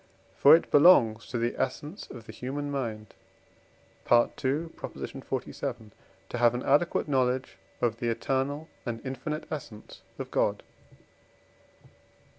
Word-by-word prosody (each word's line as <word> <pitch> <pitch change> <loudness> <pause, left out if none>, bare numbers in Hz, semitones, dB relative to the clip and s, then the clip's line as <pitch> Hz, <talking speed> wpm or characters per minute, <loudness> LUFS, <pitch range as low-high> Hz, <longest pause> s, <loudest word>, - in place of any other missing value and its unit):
For 145 +3 +8
it 170 - -1
belongs 120 -9 +6
to 125 - -3
the 120 +1 0
essence 155 +7 -4
of 115 -2 -10
the - - -9
human 145 +3 -4
mind 110 -6 -4 1.0
(II. 135 +6 +2
xlvii.), 130 -3 -5 0.4
to - - -4
have 120 0 +4
an 125 - -3
adequate 150 +5 +2
knowledge 130 -7 0 0.2
of 115 -1 +1
the 120 -2 -1
eternal 135 +6 -1 0.2
and 115 -2 -4
infinite 135 +4 -4
essence 120 -8 -8 0.2
of - - -6
God. - - +1
130 Hz, 120 wpm, -28 LUFS, 120-145 Hz, 1.0 s, For